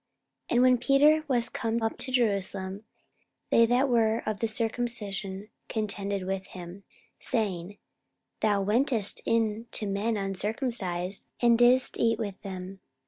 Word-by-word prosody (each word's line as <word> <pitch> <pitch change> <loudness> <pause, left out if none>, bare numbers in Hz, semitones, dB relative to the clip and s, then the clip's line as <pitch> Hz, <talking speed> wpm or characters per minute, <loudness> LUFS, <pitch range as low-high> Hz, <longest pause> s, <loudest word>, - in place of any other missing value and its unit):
44:011:002 - - 0
And 240 - +5
when 255 -1 +5
Peter 295 +5 +4
was 240 -4 +1
come 230 -1 -2
up 225 - 0
to 260 - -3
Jerusalem, 200 -4 0 0.7
they 230 0 +6
that 250 +4 +3
were 230 -2 +2
of 215 -2 -2
the 225 - 0
circumcision 220 -4 -3 0.2
contended 200 -3 -2
with 190 0 -3
him, 180 +2 -10 0.4
44:011:003 - - -23
Saying, 205 -5 -2 0.6
Thou 205 -2 +2
wentest 225 0 +1
in 225 0 0
to 215 - -1
men 205 +3 -1
uncircumcised, 195 -2 -2
and 235 -1 +5
didst 245 +2 +3
eat 230 -1 +2
with 205 -4 -5
them. 190 -1 -7
220 Hz, 140 wpm, -28 LUFS, 195-235 Hz, 0.7 s, they